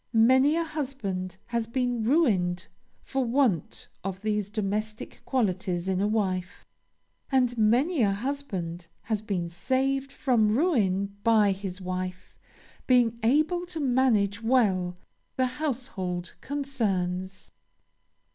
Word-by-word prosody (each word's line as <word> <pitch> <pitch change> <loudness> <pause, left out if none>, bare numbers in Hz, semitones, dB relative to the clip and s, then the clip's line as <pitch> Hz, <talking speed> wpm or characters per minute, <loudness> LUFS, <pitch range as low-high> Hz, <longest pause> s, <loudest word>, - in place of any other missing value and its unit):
Many 260 +6 +5
a 335 - +1
husband 240 - -4
has 235 -1 -2
been 245 -1 -1
ruined 215 - +2 0.4
for 270 -1 -1
want 235 - 0 0.2
of 190 0 -4
these 210 -2 0
domestic 215 +1 -3
qualities 185 -7 0
in 190 0 0
a 205 - +2
wife 190 -4 -2 0.7
and 250 -2 +3
many 245 +9 +3
a 205 -3 +4
husband 195 -8 -4 0.2
has 215 -2 -1
been 195 -5 -2
saved 265 +9 -1
from 230 -6 +2
ruin 200 - +1
by 215 -3 +5
his 190 -1 -5
wife 185 0 -5 0.5
being 240 -3 +3
able 310 +9 +2
to 340 -2 -6
manage 240 -7 +2
well 195 -7 +2 0.4
the 260 - +2
household 245 - -3
concerns. 195 -10 -2
220 Hz, 115 wpm, -27 LUFS, 190-260 Hz, 0.7 s, Many